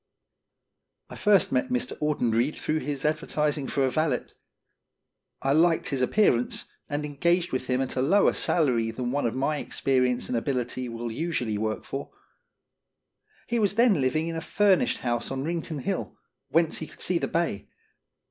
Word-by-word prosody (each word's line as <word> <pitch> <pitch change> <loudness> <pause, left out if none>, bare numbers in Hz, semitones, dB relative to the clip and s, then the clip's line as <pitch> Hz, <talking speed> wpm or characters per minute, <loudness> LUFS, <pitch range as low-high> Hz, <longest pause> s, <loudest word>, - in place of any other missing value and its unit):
1 - - -9
first 205 -2 +4
met 275 -1 +1
Mr. 250 0 -1
Audenried 130 -3 +1
through 155 +1 -1
his 145 -2 -3
adver 155 +2 0
tising 150 -2 0
for 140 - +1
a 130 - 0
valet. 155 +1 0 1.2
I 135 - +2
liked 165 +2 +3
his 135 -3 -1
appearance, 125 - +2 0.2
and 145 0 -2
engaged 170 +5 +1
with 130 0 -2
him 130 0 +1
at 130 - -3
a 130 - +1
lower 190 +10 +4
salary 125 -9 +1
than 120 +1 -3
one 140 -2 0
of 115 - -3
my 145 +3 0
experience 125 -3 0
and 125 - -2
ability 125 0 -2
will 115 0 -5
usually 120 -7 -2
work 110 0 -2
for. 140 +1 -5 1.4
He 235 0 0
was 200 -2 +1
then 230 - +4
living 155 +5 +1
in 165 - -3
a 165 - -3
furnished 200 0 +2
house 120 -1 -1
on 135 0 -3
Rincon 165 0 -3
Hill, 195 - -3 0.3
whence 165 0 +2
he 160 - -5
could - - -17
see 175 -2 0
the - - -1
bay. 165 -12 -1
145 Hz, 170 wpm, -26 LUFS, 125-170 Hz, 1.4 s, first